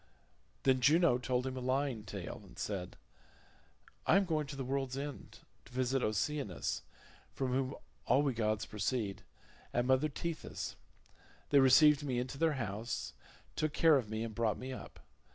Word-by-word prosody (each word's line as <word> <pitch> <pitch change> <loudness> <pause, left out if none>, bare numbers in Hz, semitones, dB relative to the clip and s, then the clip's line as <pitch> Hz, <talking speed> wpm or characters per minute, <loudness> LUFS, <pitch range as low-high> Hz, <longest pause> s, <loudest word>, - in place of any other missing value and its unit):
Then 130 -1 +3
Juno 155 -1 +5
told 125 0 0
him 130 -1 -3
a - - -3
lying 130 -3 0
tale 100 -4 -6
and - - -16
said, 95 -4 -4 1.1
"I - - +6
am 195 - +3
going 155 -4 0
to 140 - -6
the 135 - -3
world's 135 0 -2
end, 145 0 -7 0.2
to - - -16
visit 130 +1 0
Oceanus, 110 0 -1 0.5
from 130 -2 -1
whom 130 0 0 0.3
all 130 +4 +4
we 140 -3 +1
gods 110 -1 0
proceed, 105 -1 -2 0.5
and 120 0 +1
mother 130 +4 +3
Tethys; 165 +3 -4 0.8
they 140 - +7
received 145 +3 +7
me 130 -4 -1
into 125 +3 -3
their 165 -1 +3
house, 115 -2 -3 0.4
took 155 -1 0
care 160 -2 +6
of 120 -6 -3
me, 110 +1 -2
and 115 -1 -5
brought 115 -1 0
me 130 +1 -5
up. - - -10
130 Hz, 165 wpm, -34 LUFS, 115-140 Hz, 1.1 s, they